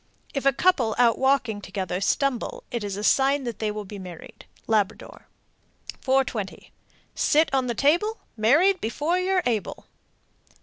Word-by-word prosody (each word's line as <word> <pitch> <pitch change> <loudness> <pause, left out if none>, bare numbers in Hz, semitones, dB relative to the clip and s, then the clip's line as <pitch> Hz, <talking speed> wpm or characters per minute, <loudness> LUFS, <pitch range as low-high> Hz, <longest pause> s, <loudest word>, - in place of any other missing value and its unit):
If 275 -1 -1
a - - +6
couple 270 -7 +2
out 235 -2 +3
walking 265 -6 +1
together 190 -2 -4
stumble, 275 - -1
it 235 -4 -3
is 200 -1 -4
a 205 - -5
sign 275 +4 +3
that 235 -3 -5
they 215 - -1
will 210 0 -5
be 200 +1 -9
married. 180 -3 -11 0.2
Labrador. 215 -3 -2 0.7
420. 260 -7 -1 0.4
Sit 310 -1 +2
on 260 -2 +1
the 240 - -2
table, 350 - +2 0.2
Married 305 - +3
before 300 +10 -1
you're 370 0 +1
able. 225 -4 -2
250 Hz, 145 wpm, -25 LUFS, 210-290 Hz, 0.7 s, a